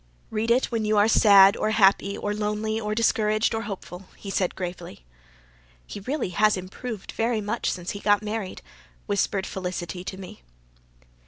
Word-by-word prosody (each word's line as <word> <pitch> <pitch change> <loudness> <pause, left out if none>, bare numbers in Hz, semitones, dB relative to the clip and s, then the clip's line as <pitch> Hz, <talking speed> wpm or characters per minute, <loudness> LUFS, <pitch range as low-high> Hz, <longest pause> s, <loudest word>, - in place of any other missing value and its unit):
"Read 220 +1 -1
it 250 +3 +2
when 230 -2 -1
you 215 0 +1
are 205 +1 +5
sad 200 -3 +7
or - - -1
happy 200 -2 +3
or 205 - -2
lonely 210 +1 -2
or 210 -1 -3
discouraged 215 -1 +2
or 225 - -1
hopeful," 195 -3 -8
he 200 - -7
said 185 -2 0
gravely. 175 - -7 0.8
"He - - -8
has 200 - -16
really 260 -10 -2 0.2
improved 195 +4 -7
very 230 0 0
much 215 +3 -2
since 175 0 -4
he 200 - -6
got 205 0 +2
married," 210 -2 -5 0.4
whispered 200 -1 0
Felicity 180 -1 -5
to 190 - -6
me. 185 - -10
205 Hz, 165 wpm, -25 LUFS, 190-220 Hz, 0.8 s, sad